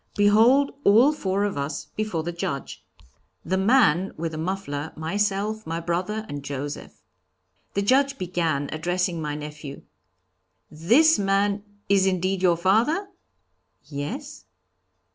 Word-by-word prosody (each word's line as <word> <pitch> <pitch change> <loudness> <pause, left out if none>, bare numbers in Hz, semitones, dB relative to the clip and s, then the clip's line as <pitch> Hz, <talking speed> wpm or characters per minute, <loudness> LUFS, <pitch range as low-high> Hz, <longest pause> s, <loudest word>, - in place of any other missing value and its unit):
Behold 225 +7 +5
all 230 +8 +6
four 195 -7 -1
of 200 -8 -2
us 140 +1 -4
before 215 -7 -2
the 175 - -3
Judge! 140 -5 -5 0.6
The 185 - 0
man 195 - +3
with 165 +1 -3
the 155 - -6
muffler, 160 -4 -4
myself, 205 +5 -2
my 165 +1 -2
brother 180 +6 -2
and 145 -5 -6
Joseph. 145 +1 -6 0.7
The 200 - +1
Judge 275 +5 +2
began, 165 -6 -1
addressing 175 +1 -1
my 150 -1 -3
nephew: 150 -1 -8 0.9
'This 235 - +4
man 200 +1 +1 0.2
is 195 -1 +3
indeed 185 0 0
your 175 -2 +3
father?' 230 - +2 0.7
'Yes.' 155 - -6
190 Hz, 125 wpm, -24 LUFS, 160-210 Hz, 0.9 s, all